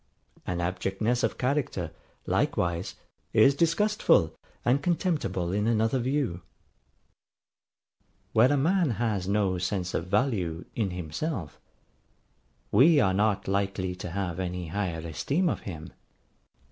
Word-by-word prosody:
An 90 -1 -1
abjectness 95 +7 -1
of - - 0
character, 125 - -1 0.3
likewise, 85 0 0 0.4
is 110 +5 +6
disgustful 165 - +3 0.3
and 130 +4 +3
contemptible 150 - 0
in 105 +3 0
another 115 +3 +2
view. 125 -8 -1 1.9
Where 120 +5 +5
a 145 - +3
man 170 +3 +2
has 105 -6 -1
no 100 -2 +1
sense 90 -1 -2
of 85 - -2
value 95 -6 0
in 105 -4 -1
himself, 90 - -4 1.1
we 145 +8 +6
are 95 -7 +3
not 105 +1 +1
likely 95 -1 -1
to 90 - -6
have 90 -1 -3
any 90 -2 -3
higher 85 -3 -2
esteem 145 - 0
of - - 0
him. 80 -4 -8
100 Hz, 120 wpm, -28 LUFS, 90-130 Hz, 1.9 s, is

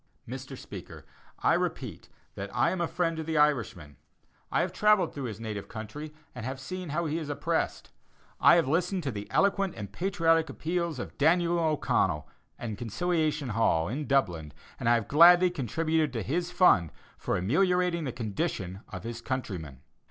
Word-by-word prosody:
Mr. - - -7
Speaker: - - -10 0.4
I - - +4
repeat - - -3 0.2
that 100 +1 -6
I 120 - +3
am 185 - -2
a 170 - +1
friend 165 -1 -1
to 160 - -3
the 160 0 -2
Irishman. 115 - +1 0.5
I - - +2
have - - -2
travelled 210 -2 +3
through 140 -2 -5
his 110 -3 -5
native 110 -3 -5
country 115 +8 -7 0.2
and 125 - -7
have 130 +2 -4
seen 185 +5 -6
how 170 +4 -1
he 155 +1 -1
is 155 -3 -6
oppressed. 145 - -2 0.5
I - - +7
have 165 -5 +3
listened 180 +5 0
to 135 - -1
the 105 -2 -7
eloquent 195 -1 +2
and 100 -2 -7
patriotic 165 - +2
appeals 170 0 -2
of - - -7
Daniel 170 +3 +3
O'Connell, 140 - +1 0.3
in 110 -4 -5
Conciliation 155 - -1
Hall, 105 -7 +2
in 140 +6 -3
Dublin, 85 - 0 0.3
and 120 - +1
I 120 - +6
have 115 -3 -1
gladly 175 +4 +7
contributed 155 +1 0
to 115 -4 -2
his 170 - -1
fund 175 - +4 0.2
for - - -2
ameliorating 175 - +1
the 130 - -2
condition 100 -4 -3
of - - -7
his 115 0 -6
countrymen. 90 - -4
150 Hz, 175 wpm, -29 LUFS, 110-170 Hz, 0.5 s, I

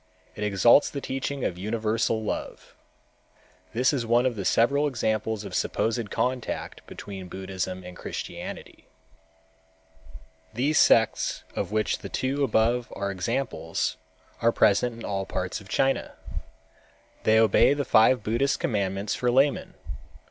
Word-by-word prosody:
It 105 - -5
exalts 105 +7 +5
the 140 - -5
teaching 135 0 -3
of 90 - -2
universal 110 +1 0
love. 105 - -5 1.0
This 125 +4 +2
is 130 -4 0
one 120 +2 +3
of 110 -7 -1
several 140 +6 +3
examples 110 -4 -1
of 100 - -7
a - - -5
supposed 115 -1 -1
contact 125 +2 -3
between 95 -2 -8
Buddhism 95 0 -5
and 90 0 -10
Christianity. - - -7 1.7
These 140 +6 +2
sects - - +3
of - - -3
which 110 0 0
the - - -8
two 135 +2 -1
above 120 -1 +1
are 100 0 -2
examples 115 +9 -2 0.4
are 115 - +4
present 115 +3 +3
in 115 - -8
all 95 -1 -2
parts 90 +3 -3
of 95 - -15
China. 135 0 0 1.1
They 110 0 +4
obey 110 +5 +5
the 145 -1 -2
five 115 0 +4
Buddhist 120 +6 +1
commandments 100 -2 -1
for 125 - 0
laymen. 135 +3 +2
115 Hz, 135 wpm, -26 LUFS, 100-130 Hz, 1.7 s, exalts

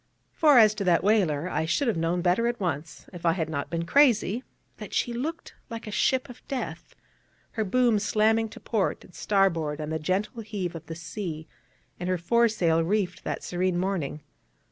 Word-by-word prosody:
For, 300 -4 +5
as 215 -2 +7
to 210 -1 -3
that 170 -2 +3
whaler, 180 -7 +2
I 160 -3 -1
should 245 - 0
have 230 - +2
known 165 +2 0
better 185 +6 +2
at 240 0 -2
once, 165 -4 -4
if 175 -1 -9
I 165 -1 +3
had 160 -3 -2
not 140 -2 -3
been 170 0 -2
crazy, 240 -2 +3 0.4
since - - -7
she 240 - 0
looked 305 +8 -4 0.2
like 230 0 -6
a 215 - -6
ship 260 +5 +1
of 250 -1 -12
death, 270 -2 -5 0.6
her 220 - -1
boom 235 +1 +2
slamming 220 +2 +2
to - - -11
port 215 -5 -1
and 175 - -17
starboard 170 -5 +1
on 155 0 -4
the 160 - -1
gentle 195 - -2
heave 205 -5 -4
of 165 -1 -9
the 165 - -6
sea, 160 -2 -6 0.5
and 180 +1 -3
her 185 - +1
fore 235 +8 +3
sail 165 -7 +1
reefed 185 0 -1
that - - -3
serene 180 0 -1
morning. 175 -6 -2
185 Hz, 195 wpm, -27 LUFS, 165-225 Hz, 0.6 s, as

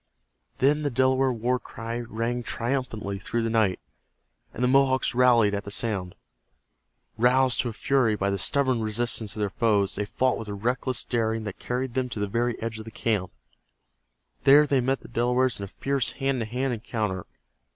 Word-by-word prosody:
Then 145 +3 +3
the 145 - 0
Delaware 130 +1 +2
war 125 +2 0
cry 115 0 -6
rang 120 +1 -3
triumphantly 115 -5 -3
through 115 +4 -2
the 115 - -1
night, 110 -5 +2 0.7
and 125 - -4
the - - +4
Mohawks 130 0 +3
rallied 120 -4 +4
at 100 0 -2
the 100 - -7
sound. 100 -4 -2 1.0
Roused 125 +1 +3
to 120 - -3
a - - -7
fury 125 -2 +2
by 100 -1 -1
the 100 - -1
stubborn 130 +1 +1
resistance 110 0 -2
of 105 - -4
their 100 -2 -1
foes, 105 -4 +2
they 105 - -2
fought 130 +5 0
with 115 - -6
a 105 - -4
reckless 125 +4 0
daring 115 -2 -1
that 105 -3 -6
carried 125 0 -3
them 130 0 -1
to 110 - -5
the 105 - 0
very 115 +3 -1
edge 115 -1 -4
of 110 - -8
the - - -7
camp. 105 -5 -1 1.1
There 145 +2 +7
they 140 -3 +2
met 130 +2 0
the - - -12
Delawares 125 +1 +1
in 100 - -4
a - - -9
fierce 135 +5 -1
hand 135 -2 -1
to 115 - -2
hand 125 +3 -1
encounter. 105 -5 -3
120 Hz, 190 wpm, -26 LUFS, 110-130 Hz, 1.1 s, There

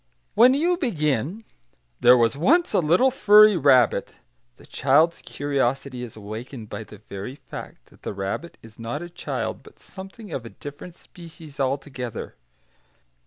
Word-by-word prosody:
When 245 +5 +6
you 345 +5 +1
begin, 160 - -1 0.6
"There 125 +1 +7
was 115 +2 +2
once 320 - +2
a - - +4
little 180 +11 +3
furry 210 -3 +6
rabbit," 130 -7 +3 0.4
the - - -17
child's 155 +5 +2
curiosity 135 -2 -2
is 120 -3 -8
awakened 110 +2 -8
by 110 - -6
the 105 - -13
very 100 +4 -8
fact - - -11
that - - -21
the - - -5
rabbit 100 - -5
is 115 0 -15
not 120 +8 -4
a 175 - -9
child, - - -4
but - - -18
something 195 +3 -11
of 130 - -4
a 115 - -9
different 145 +7 -10
species 165 -6 -14
altogether. 130 -3 -3
145 Hz, 150 wpm, -24 LUFS, 120-180 Hz, 0.6 s, There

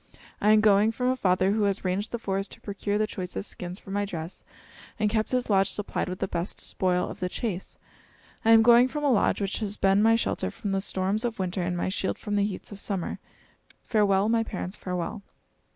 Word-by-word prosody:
I 210 - +3
am 215 0 +6
going 210 0 +5
from 250 +2 -1
a 255 - +2
father 185 -4 +2
who 215 +1 +1
has 200 -1 -1
ranged 190 +3 -1
the 235 - -3
forest 195 -3 -3
to - - -15
procure 205 0 -2
the 215 - +2
choicest 190 -1 -5
skins 180 +2 -7
for 195 - -11
my 205 +1 0
dress 170 -3 -6 0.6
and 210 -1 +2
kept 220 -1 0
his 250 -1 0
lodge 195 -2 +3
supplied 205 -2 -2
with 185 - -4
the 195 - -2
best 170 +1 -3
spoil 180 -1 0
of - - -8
the 180 - -2
chase. 190 -3 -4 0.7
I 225 - +2
am 225 0 +8
going 240 +2 +7
from 295 +3 -4
a 285 - +3
lodge 215 -2 +2
which 195 -1 -1
has 210 -2 -2
been 195 +1 +3
my 225 +1 +5
shelter 230 - -1
from 205 -3 -5
the 195 0 0
storms 195 +3 0
of 235 -2 -2
winter 185 -1 -2
and 175 0 -1
my 175 - -1
shield 190 0 -2
from 205 -1 -3
the 205 - +3
heats 205 0 -6
of 200 - -8
summer. 195 -4 -3 0.6
Farewell, 205 -3 +2
my 225 0 +3
parents, 195 -3 -4
farewell!" 180 +3 -4
200 Hz, 225 wpm, -27 LUFS, 190-220 Hz, 0.7 s, am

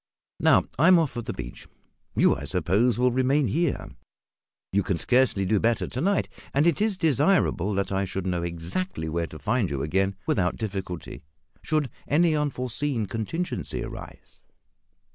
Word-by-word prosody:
Now, - - +5 0.2
I 160 - +5
am 185 -1 +8
off 160 -4 +1
for 120 - -4
the - - -5
beach. - - -8 0.5
You, - - +4
I 70 - -6
suppose, 95 - +1
will 125 +1 +3
remain 130 +3 +2
here; 155 - 0 0.9
you 100 - +3
can 95 -3 -1
scarcely 125 -3 +2
do 105 +2 +2
better 115 +2 +1
to 130 - -5
night, 200 +4 +1 0.3
and 145 +3 +4
it 170 +2 +2
is 215 -3 +1
desirable 145 - +2
that 100 0 -1
I 95 0 0
should 95 0 -4
know 90 -2 -1
exactly 85 - -3
where 85 +1 -2
to 80 - -10
find 110 - 0
you 70 -2 -2
again 95 +5 0
without 90 -2 +1
difficulty, 95 -6 -5 0.4
should 155 -3 0 0.2
any 160 +1 +3
unforeseen 135 -3 -1
contingency 115 - -3
arise." - - -10
115 Hz, 160 wpm, -26 LUFS, 95-150 Hz, 0.9 s, am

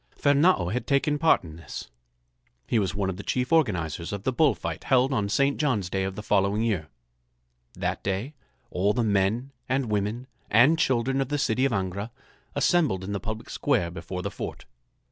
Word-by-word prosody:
Fernâo 145 - +3
had 125 - -3
taken 145 +1 +2
part 165 - +4
in 80 -2 -10
this. 80 - -8 0.7
He 115 - +1
was 100 -1 -1
one 100 -1 0
of 90 - -8
the - - -5
chief 125 +5 -1
organizers 85 - +1
of 100 -1 -5
the 130 - 0
bull 150 +2 +3
fight - - -5
held 130 0 +3
on 100 -5 0
St. 140 +6 +2
John's 110 - 0
Day 95 0 0
of 95 0 -4
the 105 - -6
following 100 +1 +2
year. 100 -9 -1 0.9
That - - -2
day 100 +9 -2 0.4
all 100 +3 +1
the 120 - 0
men 105 +5 +1 0.2
and 130 -3 0
women 105 +4 -1 0.2
and 135 +10 +5
children 130 -1 +1
of 135 - -2
the 145 - 0
city 130 -2 +1
of 135 - +1
Angra 100 +1 -2 0.5
assembled 145 - +2
in 95 - -5
the 100 - -2
public 110 0 -6
square 85 0 0
before 90 +2 -6
the - - -3
fort. - - -6
110 Hz, 190 wpm, -26 LUFS, 95-135 Hz, 0.9 s, and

